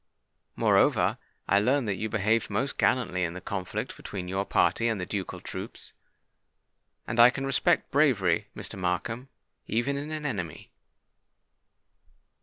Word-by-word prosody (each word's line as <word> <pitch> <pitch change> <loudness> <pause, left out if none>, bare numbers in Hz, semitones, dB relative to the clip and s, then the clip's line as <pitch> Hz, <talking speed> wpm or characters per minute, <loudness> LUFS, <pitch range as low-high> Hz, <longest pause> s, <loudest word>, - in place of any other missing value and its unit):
Moreover, - - +3 0.3
I 100 - +4
learn 130 +5 +2
that 105 - 0
you 110 +3 -3
behaved 110 +1 +1
most 135 - -2
gallantly 90 -8 +2
in 85 0 -2
the - - -5
conflict 95 0 -4
between 95 -3 -6
your 95 +2 -1
party 95 +7 +2
and 110 -3 0
the 90 - -3
ducal 100 -1 -4
troops; - - -8 1.1
and 115 +2 -3
I 120 +1 +10
can 135 +1 -4
respect 140 +5 +2
bravery, 110 - +3
Mr. - - -5
Markham, 115 +8 -2 0.4
even 135 +5 0
in 145 +2 -5
an 155 -1 -5
enemy." 90 - -4
110 Hz, 140 wpm, -28 LUFS, 95-130 Hz, 1.1 s, I